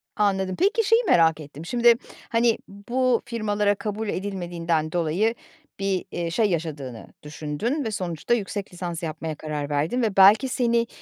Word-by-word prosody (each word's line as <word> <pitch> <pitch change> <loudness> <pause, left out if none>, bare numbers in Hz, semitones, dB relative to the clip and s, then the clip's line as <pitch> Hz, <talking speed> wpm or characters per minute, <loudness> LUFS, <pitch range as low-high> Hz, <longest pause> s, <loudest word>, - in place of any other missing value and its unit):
Anladım, 190 -2 +1
peki 435 +5 +3
şeyi 455 +2 +4
merak 165 -1 +4
ettim: 150 +1 -10
Şimdi, 235 +4 +5 0.4
hani, 230 0 +3
bu 240 +5 0
firmalara 210 -3 0
kabul 215 +1 -4
edilmediğinden 175 -5 -2
dolayı 175 +7 +1 0.4
bir, 195 -2 -1
eee, 170 -1 -3
şey, 215 +2 +2
yaşadığını 145 -8 -4 0.2
düşündün 150 - -3
ve 220 - -3
sonuçta 180 +1 -2
yüksek 205 -4 -3
lisans 175 -1 -5
yapmaya 160 -1 -4
karar 150 -1 -4
verdin 150 - 0
ve 215 -4 -1
belki 205 +7 +7
seni 235 -1 +1
195 Hz, 145 wpm, -24 LUFS, 165-230 Hz, 0.4 s, belki